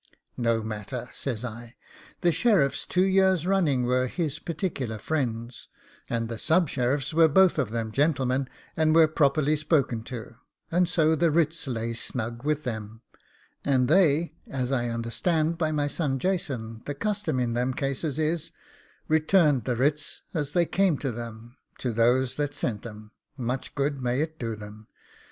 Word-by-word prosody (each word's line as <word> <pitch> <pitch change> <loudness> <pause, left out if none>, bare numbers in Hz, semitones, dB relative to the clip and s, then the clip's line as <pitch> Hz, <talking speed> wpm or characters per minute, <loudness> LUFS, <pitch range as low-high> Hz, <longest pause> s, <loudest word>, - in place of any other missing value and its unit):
'No 115 -2 +1
matter,' 110 +3 -5
says 125 -3 -4
I, 115 0 -8 0.5
'the 175 - +4
sheriffs 165 - +2
two 180 - +2
years 190 -3 +3
running 165 -10 +2
were 125 +1 +2
his 155 0 -2
particular 150 - -3
friends, 120 -3 -3 0.4
and 115 -1 -1
the 115 -1 -5
sub 165 -1 +3
sheriffs 135 +3 0
were 165 0 +6
both 180 +2 +4
of 130 -6 0
them 115 -1 -3
gentlemen, 135 -1 +1 0.3
and 160 0 +3
were 165 -1 +7
properly 150 0 +2
spoken 145 -6 +1
to; 120 -2 -8 0.3
and 175 +1 +2
so 160 -2 +3
the 165 +1 +3
writs 160 -1 +1
lay 115 -2 -2
snug 115 +1 -5
with 150 0 0
them, 110 -2 -5 0.6
and 130 -3 +2
they, 160 -1 +3 0.2
as 130 -1 -2
I 120 -3 0
understand 155 +8 0
by 155 -2 +1
my 150 -1 0
son 145 -2 -1
Jason 125 -10 -2
the 145 - -3
custom 200 -5 -1
in 120 -2 0
them 125 +2 0
cases 140 +1 -2
is, 160 +1 -1 0.6
returned 155 - +3
the 125 - 0
writs 145 +5 -1
as 145 -3 -2
they 175 -1 +3
came 185 -3 +2
to 135 -1 -2
them 115 +1 -8 0.2
to 125 -3 -2
those 120 +3 +2
that 145 -1 -1
sent 120 -5 -3
'em 105 -1 -11 0.3
much 125 +1 -3
good 140 -1 -1
may 125 +2 0
it 160 0 -4
do 115 -2 -3
them! 105 +1 -11
135 Hz, 165 wpm, -27 LUFS, 120-160 Hz, 0.6 s, were